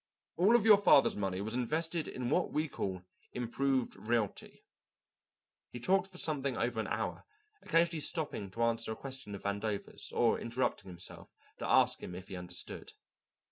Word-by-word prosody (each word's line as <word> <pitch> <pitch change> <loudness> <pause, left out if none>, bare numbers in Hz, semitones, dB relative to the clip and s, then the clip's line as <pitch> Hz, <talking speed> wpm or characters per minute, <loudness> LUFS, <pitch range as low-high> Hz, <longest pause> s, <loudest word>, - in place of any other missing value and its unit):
"All 200 +7 +5
of 230 -3 +4
your 210 -3 +8
father's 145 -8 +6
money 95 -2 -2
was 110 +2 -3
invested 160 +7 0
in 125 0 -3
what 180 - +2
we 155 +1 0
call 95 -9 -4 0.3
'improved 130 +2 0
realty.'" 115 -2 -2 1.0
He 120 - -7
talked 190 +8 +2
for 185 -2 -11
something 140 -7 0
over 120 -1 0
an 110 - -1
hour, 110 -4 -2 0.4
occasionally 165 -2 +2
stopping 145 - -1
to 115 +5 -2
answer 115 -1 0
a - - -8
question 135 -6 -6
of 100 - -9
Vandover's, 100 +1 -3
or 115 -2 +2
interrupting 115 -5 -2
himself 90 -1 -7 0.3
to - - -3
ask - - +4
him 90 - -7
if 95 +2 -9
he 95 - -5
understood. 90 0 -6
120 Hz, 165 wpm, -33 LUFS, 100-155 Hz, 1.0 s, your